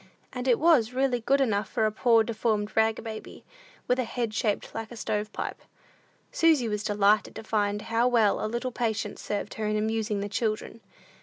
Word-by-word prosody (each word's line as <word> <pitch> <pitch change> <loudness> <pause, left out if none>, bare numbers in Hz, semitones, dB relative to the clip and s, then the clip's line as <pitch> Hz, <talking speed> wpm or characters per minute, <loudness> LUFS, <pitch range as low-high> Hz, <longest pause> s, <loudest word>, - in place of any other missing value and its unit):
And 250 0 -4
it 245 -3 +4
was 290 -8 +4
really 260 -2 +1
good 275 +5 +2
enough 210 -6 0
for 220 - 0
a 215 - +1
poor 230 +1 +4
deformed 215 -2 -1
rag 220 0 +2
baby, 220 -2 -8 0.4
with 250 +1 +2
a - - +2
head 235 -1 -3
shaped 210 -1 -1
like 225 0 -6
a - - -8
stove 215 -2 -2
pipe. - - -5 0.7
Susy 315 -7 +3
was 210 -1 -2
delighted 205 0 +2
to - - -7
find 210 -1 -1
how 230 +2 +1
well 230 -5 +3
a 215 - -1
little 240 +3 -3
patience 230 -3 -2
served 205 0 -4
her 215 -1 -3
in 215 0 0
amusing 220 -1 -1
"the 200 - -3
children." 215 +1 -3
220 Hz, 190 wpm, -27 LUFS, 210-240 Hz, 0.7 s, it